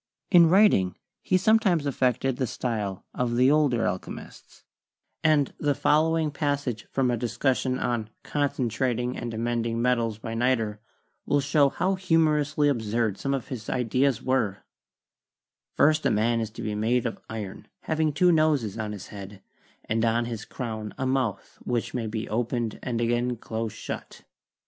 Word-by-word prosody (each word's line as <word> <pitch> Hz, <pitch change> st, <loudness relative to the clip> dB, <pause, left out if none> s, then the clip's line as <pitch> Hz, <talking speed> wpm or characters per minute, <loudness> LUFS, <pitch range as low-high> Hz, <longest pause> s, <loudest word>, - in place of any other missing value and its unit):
In 170 Hz, -3 st, +7 dB
writing 175 Hz, -, +4 dB, 0.2 s
he 185 Hz, -, +2 dB
sometimes 195 Hz, -6 st, +3 dB
affected 130 Hz, -1 st, 0 dB
the 130 Hz, -2 st, 0 dB
style 105 Hz, -6 st, -3 dB
of 120 Hz, -1 st, -1 dB
the 130 Hz, +3 st, +5 dB
older 140 Hz, -8 st, +3 dB
alchemists, 90 Hz, 0 st, -6 dB, 0.6 s
and 155 Hz, -3 st, +3 dB
the 145 Hz, -2 st, +1 dB
following 160 Hz, +1 st, +2 dB
passage 145 Hz, -6 st, -2 dB
from 130 Hz, -2 st, +1 dB
a -, -, +1 dB
discussion 130 Hz, +2 st, 0 dB
on 120 Hz, -4 st, -2 dB
"concentrating 125 Hz, -3 st, -1 dB
and 120 Hz, -, -4 dB
amending 115 Hz, 0 st, -1 dB
metals 120 Hz, -3 st, +1 dB
by 115 Hz, +1 st, -6 dB
niter" 115 Hz, -3 st, 0 dB, 0.5 s
will 145 Hz, -, +3 dB
show 140 Hz, 0 st, +3 dB
how 185 Hz, +7 st, 0 dB
humorously 155 Hz, -5 st, +2 dB
absurd 115 Hz, -5 st, 0 dB
some 140 Hz, 0 st, 0 dB
of 135 Hz, -, -6 dB
his 115 Hz, -5 st, -6 dB
ideas 125 Hz, +1 st, +1 dB
were: 120 Hz, -7 st, 0 dB, 1.1 s
"First 155 Hz, +2 st, +4 dB
a -, -, +3 dB
man 115 Hz, +2 st, +2 dB
is 110 Hz, -, -3 dB
to 115 Hz, -, -8 dB
be 105 Hz, -, -2 dB
made 115 Hz, +4 st, +1 dB
of 115 Hz, -, -3 dB
iron, 105 Hz, -3 st, -6 dB
having 160 Hz, -1 st, 0 dB
two 175 Hz, +5 st, +4 dB
noses 150 Hz, -, +2 dB
on 105 Hz, -1 st, -3 dB
his 100 Hz, -, -9 dB
head, 100 Hz, -1 st, -10 dB, 0.4 s
and 110 Hz, +1 st, 0 dB
on 115 Hz, +1 st, +2 dB
his 115 Hz, -2 st, -5 dB
crown 110 Hz, -4 st, -5 dB
a 135 Hz, -, -2 dB
mouth 130 Hz, -6 st, -2 dB
which 120 Hz, -2 st, -2 dB
may 115 Hz, -3 st, -2 dB
be 110 Hz, 0 st, -4 dB
opened 120 Hz, 0 st, -2 dB
and 120 Hz, -2 st, -2 dB
again 120 Hz, +1 st, +1 dB
close 110 Hz, 0 st, -4 dB
shut. -, -, -7 dB
125 Hz, 155 wpm, -26 LUFS, 110-145 Hz, 1.1 s, In